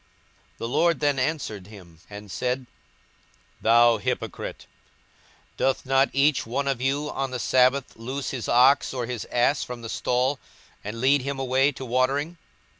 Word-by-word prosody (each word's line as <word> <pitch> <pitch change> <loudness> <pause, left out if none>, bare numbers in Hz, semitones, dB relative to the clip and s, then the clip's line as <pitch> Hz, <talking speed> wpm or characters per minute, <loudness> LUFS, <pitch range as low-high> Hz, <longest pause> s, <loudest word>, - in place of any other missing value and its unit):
42:013:015 - - -36
The 115 - -4
Lord 170 +7 +2
then 145 -2 +1
answered 125 - -3
him, 90 -6 -14
and 105 -1 -10
said, 125 +1 -2 1.0
Thou 115 0 +5
hypocrite, - - -4 0.9
doth 135 +1 0
not 135 +1 +3
each 140 +1 +2
one 135 +5 -3
of 135 -3 -1
you 140 +3 -1
on 135 0 -2
the 130 - -4
sabbath 130 +2 +2
loose 130 +5 -5
his 125 -4 -5
ox 130 +3 +4
or 125 -2 -2
his 120 -2 -5
ass 125 +4 +1
from 125 -1 -8
the 115 - -6
stall, 130 +5 0 0.4
and 105 +3 -6
lead 140 +2 +4
him 140 +1 -4
away 135 +1 +2
to 130 - -8
watering? 135 +7 0
130 Hz, 160 wpm, -25 LUFS, 120-140 Hz, 1.0 s, Thou